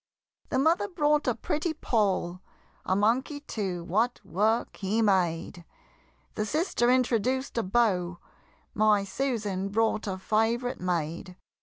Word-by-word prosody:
The - - 0
mother 325 +8 +3
brought 300 -6 +1
a 245 - +2
pretty 310 +2 -2
Poll 195 - 0 0.4
A 185 - +1
monkey 245 +8 +1
too, 190 -10 -4
what 220 +8 0
work 215 +6 0
he 205 +3 -1
made! 175 -4 0 0.7
The 215 - -2
sister 260 - +1
introduced 255 +1 +1
a - - +2
Beau 185 -5 +1 0.6
My 210 -1 +3
Susan 205 -4 -2
brought 220 +1 0
a 190 -1 -2
favorite 225 +5 0
maid. 175 0 -2
215 Hz, 125 wpm, -28 LUFS, 190-255 Hz, 0.7 s, mother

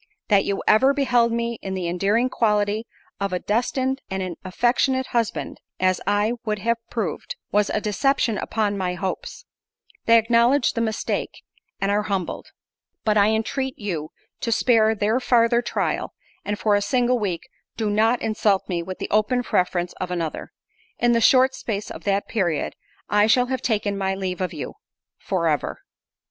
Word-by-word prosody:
That 200 -2 +4
you 200 - -2
ever 265 +6 +5
beheld 245 -4 +3
me 235 0 -2
in 190 -1 -4
the 180 -2 -2
endearing 200 +8 +1
quality 210 -2 0 0.3
of 200 -1 -1
a - - +1
destined 260 +6 -1
and 190 -1 -2
an 180 -2 -4
affectionate 245 +7 +1
husband, 235 -3 -1 0.2
(such 185 - +1
as 185 0 +1
I 205 +3 +2
would 215 -1 -1
have 230 +4 0
proved) 205 -10 -3 0.2
was 205 0 +2
a - - 0
deception 220 +1 +1
upon 205 -3 -1
my 180 -1 -1
hopes: 190 - -5 0.6
they 230 0 +7
acknowledge 235 +4 +3
the 230 - -1
mistake, 220 -1 -2 0.4
and 195 0 0
are 205 +1 +2
humbled—but 205 +2 -4
I 205 -1 +5
entreat 255 +4 -1
you 170 -8 -4 0.3
to 230 - -2
spare 225 -1 +3
their 215 +4 +1
farther 235 -1 +3
trial, - - -2 0.3
and 205 0 -2
for 210 0 +1
a 205 - +3
single 245 +3 +1
week 185 -6 -3 0.3
do 220 -2 -1
not 220 +4 +2
insult 210 -3 +1
me 175 -2 -1
with 185 +2 -6
the - - -5
open 215 +4 +2
preference 180 -4 0
of 185 - -2
another. 170 -3 -4 0.5
In 240 - +3
the 230 -1 +3
short 260 +2 +5
space 210 -4 -4
of - - -9
that 200 0 0
period 175 -8 -1 0.3
I 210 +1 +3
shall 245 +3 +4
have 260 - -2
taken 205 -3 -1
my 190 0 0
leave 190 -1 -3
of 180 -3 -1
you—for 175 - -5
ever. 150 -3 -1
210 Hz, 170 wpm, -23 LUFS, 195-235 Hz, 0.6 s, they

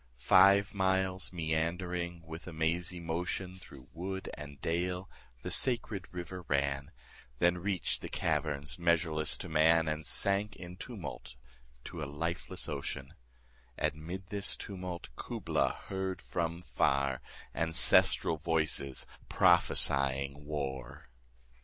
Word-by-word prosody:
Five 100 +9 +6
miles 95 -2 +1
meandering 85 +1 -2
with 80 +2 -8
a - - -5
mazy 85 +2 -1
motion 90 +2 -3
25 - - -18
Through 65 -7 -13
wood 95 +3 -4
and 75 -2 -9
dale 90 +3 -1 0.4
the - - -3
sacred 115 -7 +1
river 90 +1 -6
ran, 70 -1 0 0.5
Then 85 +4 +3
reach'd 95 0 -1
the - - -6
caverns 75 +1 0
measureless 85 -2 +2
to - - -6
man, 80 +1 +4
And 75 0 -1
sank 100 +4 +1
in 90 -1 -9
tumult 100 - -7 0.5
to 85 - -7
a - - -1
lifeless 85 +5 -3
ocean: 70 -3 -4 0.6
And - - +1
'mid 85 +5 -7
this 100 -1 -1
tumult 90 -3 -6
Kubla - - 0
heard 95 -1 -4
from 85 0 -3
far 70 -2 +1 0.3
Ancestral 80 0 +4
voices 80 -4 0 0.2
prophesying 70 +1 +4
war! 65 -4 -4
85 Hz, 120 wpm, -32 LUFS, 75-90 Hz, 0.6 s, Five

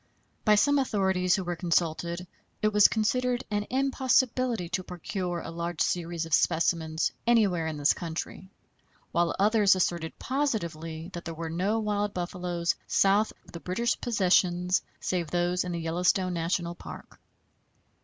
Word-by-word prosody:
By 210 -1 +5
some 285 +7 +4
authorities 190 -7 +1
who 190 - -2
were 175 0 -3
consulted 170 +1 -1 0.4
it 215 0 +2
was 210 -1 +7
considered 250 +3 0
an 205 0 -1
impossibility 255 -5 +1
to 185 +1 -2
procure 180 0 -4
a - - -7
large 170 -1 -4
series 170 -1 -1
of 165 - -6
specimens 160 -1 +1 0.2
anywhere 200 -9 +3
in 155 -1 -4
this 145 0 +3
country, 170 +2 -6 0.6
while 170 0 +1
others 205 -1 +4
asserted 170 -3 -1
positively 170 - -3
that 175 - -7
there 165 -1 -5
were 165 0 -5
no 190 +6 0
wild 210 -1 -1
buffaloes 175 -1 -2
south 200 +2 +3
of - - -16
the 170 - -7
British 230 +8 -1
possessions 180 -4 +2 0.2
save 175 -4 -2
those 175 +1 0
in 180 - -4
the 170 - -2
Yellowstone 180 +3 +1
National 170 0 -1
Park. - - -11
180 Hz, 145 wpm, -28 LUFS, 170-210 Hz, 0.6 s, was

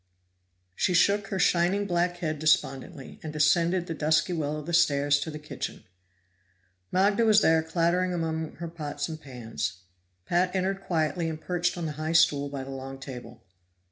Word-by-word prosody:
She 185 -2 +1
shook 200 +3 +3
her 195 - -3
shining 180 +3 +2
black 175 -1 0
head 155 -4 -3
despondently, 140 -1 0
and 155 - -6
descended 165 +4 +2
the 165 - -4
dusky 155 +2 +1
well 155 -2 -2
of 150 - -7
the 170 - -5
stairs 145 -3 +3
to 160 - -4
the 150 - -6
kitchen. 150 0 -6 1.1
Magda 200 +4 +3
was 215 -1 +5
there 160 -3 +4
clattering 170 +3 +1
among 160 -2 -2
her 170 - -6
pots 150 -3 -4
and 160 -1 -7
pans; 115 - -5 0.4
Pat 180 +2 +1
entered 190 +1 -1
quietly 165 -1 -1
and 155 -1 -5
perched 175 +1 -1
on 170 - -3
the 155 - -2
high 160 +1 -1
stool 145 -4 +4
by 140 -1 -5
the 135 - -8
long 135 0 -7
table. 120 -4 -9
160 Hz, 170 wpm, -27 LUFS, 145-175 Hz, 1.1 s, was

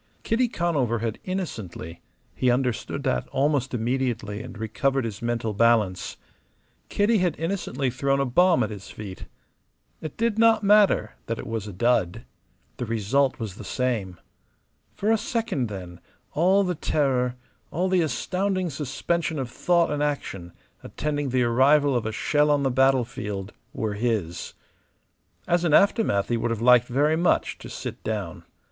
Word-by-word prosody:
Kitty 245 +2 +2
Conover 150 - 0
had 115 -1 -3
innocently 105 - -5 0.3
he 130 - +1
understood 125 -2 -1
that 60 - 0
almost 135 -1 0
immediately 120 -3 -2
and - - -9
recovered 130 +4 0
his 110 -3 -5
mental 115 -2 -1
balance 105 -4 +2 0.7
Kitty 210 +2 +2
had 175 -4 0
innocently 160 -7 -2
thrown 135 +2 0
a 140 - +2
bomb 175 +8 +4
at - - -3
his 100 -2 -9
feet. 100 -3 -8 0.8
It 155 - -7
did 225 -1 0
not 225 -2 +5
matter 205 0 +4
that 115 - -2
it - - -7
was 115 -2 -4
a - - -6
dud. 115 0 0 0.5
The 125 - -4
result 115 +5 +1
was 110 -5 -5
the - - -10
same. 110 -9 -2 0.8
For 210 +2 0
a 225 - +3
second, 220 - -1
then, 90 -4 -8 0.3
all 185 +6 +3
the 180 -1 0
terror, 130 -6 0 0.3
all 180 +4 -1
the 185 -1 +3
astounding 185 +2 -1
suspension 150 +3 -2
of 130 -3 -4
thought 170 +2 +2
and 145 0 -1
action 100 -12 -3 0.3
attending 145 -2 -3
the 130 0 +2
arrival 135 +4 +4
of 120 -2 0
a - - -2
shell 150 +6 +1
on 145 -1 +3
the 135 - +1
battlefield 120 -6 0 0.2
were 110 -2 -3
his. 105 -6 -2 0.9
As 175 0 +2
an 160 -3 +4
aftermath 200 - +3
he 120 - +1
would 115 - -1
have 115 -2 -2
liked 125 +1 +5
very 145 +5 +2
much 175 - +1
to - - -9
sit - - -7
down. - - -4
130 Hz, 155 wpm, -25 LUFS, 115-165 Hz, 0.9 s, not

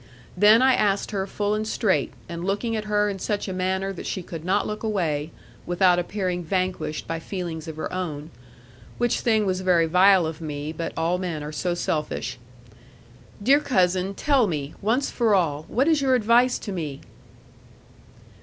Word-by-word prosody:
Then 210 +6 +6
I 265 0 +5
asked 200 -3 +1
her 195 -2 -2
full 205 +1 -1
and 215 0 -2
straight, 190 - +1 0.2
and 170 0 -6
looking 205 +4 -1
at 215 -1 -3
her 210 0 +1
in 195 -2 -3
such 205 +2 -2
a 190 - -3
manner 190 +1 -1
that 180 - -7
she 185 - -3
could 165 -2 -8
not 190 +4 +1
look 210 0 -4
away, 165 -9 -1 0.4
without 175 0 +3
appearing 180 -1 -2
vanquished 185 -3 -2
by 165 0 -3
feelings 170 -2 -5
of 160 - -6
her 155 - -5
own 160 -4 -4 0.7
which 240 -1 +1
thing 220 -3 +2
was 185 -1 -1
very 180 -3 +3
vile 180 +2 +5
of 160 0 -5
me; 150 0 -5
but 165 +1 -4
all 170 +2 0
men 170 -5 -3
are 150 - -5
so 175 +3 -2
selfish, 155 -6 -3 1.0
'Dear 275 +6 +5
cousin, 185 -7 +1
tell 275 -4 +2
me, 150 -4 -3
once 240 +7 +1
for 225 -4 +2
all, 155 -5 0
what 265 +5 +1
is 315 -3 +3
your 265 -2 +3
advice 245 +2 +3
to 205 - -7
me?' 155 -7 -5
185 Hz, 180 wpm, -24 LUFS, 165-210 Hz, 1.0 s, Then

